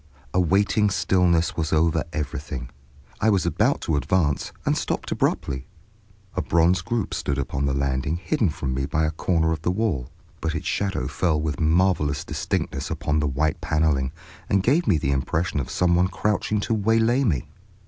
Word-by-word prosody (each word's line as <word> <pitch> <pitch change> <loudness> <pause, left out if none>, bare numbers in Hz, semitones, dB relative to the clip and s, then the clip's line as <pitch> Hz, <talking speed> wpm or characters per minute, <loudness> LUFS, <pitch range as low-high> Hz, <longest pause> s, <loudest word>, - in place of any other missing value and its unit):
A 90 - +3
waiting 100 +4 +3
stillness 90 -3 +2
was 80 -2 -2
over 80 0 +2
everything. 70 -4 -4 0.5
I 110 - +3
was 100 -4 +2
about - - +1
to 80 - 0
advance, 75 -1 0
and - - +2
stopped - - -3
abruptly. 65 -1 -1 0.7
A - - -1
bronze 85 +2 +3
group 120 -4 -2
stood 70 - -2
upon 70 0 -1
the 65 - 0
landing 70 +3 0
hidden 105 - 0
from 70 -3 -3
me 65 +1 -1
by 80 +1 +1
a 80 - 0
corner 80 0 +1
of 80 -2 -2
the 85 - 0
wall; 90 - -1 0.3
but 80 0 -2
its 85 - -4
shadow 95 -11 -1
fell 80 -4 0
with 75 -3 -2
marvelous 80 -3 +2
distinctness 70 +1 -2
upon 75 +1 -1
the 75 - +1
white 75 +3 0
paneling, 75 -4 +1 0.4
and 100 -1 +2
gave 150 - +2
me 90 - +4
the 70 -2 -1
impression 75 +4 0
of 65 - -3
some 90 -1 +2
one 90 +1 +4
crouching 105 +2 0
to 115 - -1
waylay 115 +4 +2
me. 80 - 0
80 Hz, 180 wpm, -24 LUFS, 70-95 Hz, 0.7 s, me